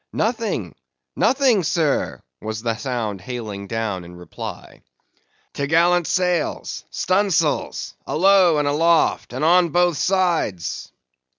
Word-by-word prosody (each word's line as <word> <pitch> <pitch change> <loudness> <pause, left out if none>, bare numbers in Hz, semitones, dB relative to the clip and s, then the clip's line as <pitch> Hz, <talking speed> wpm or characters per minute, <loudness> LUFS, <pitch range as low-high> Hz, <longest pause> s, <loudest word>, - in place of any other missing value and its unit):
"Nothing, 215 - -2 0.4
nothing 255 -6 +3
sir!" 155 -2 0 0.2
was 110 0 -5
the 115 -1 0
sound 115 -7 -3
hailing 110 -6 -6
down 105 -4 -3
in 85 +1 -12
reply. 90 0 -9 0.7
"T'gallant 170 +4 +2
sails!—stunsails! 180 -1 -1
alow 185 -1 +4
and 145 -1 +1
aloft, 165 +3 +2
and 130 +5 -2
on 175 +1 +4
both 175 0 +2
sides!" 170 - -1
155 Hz, 100 wpm, -21 LUFS, 115-180 Hz, 0.7 s, alow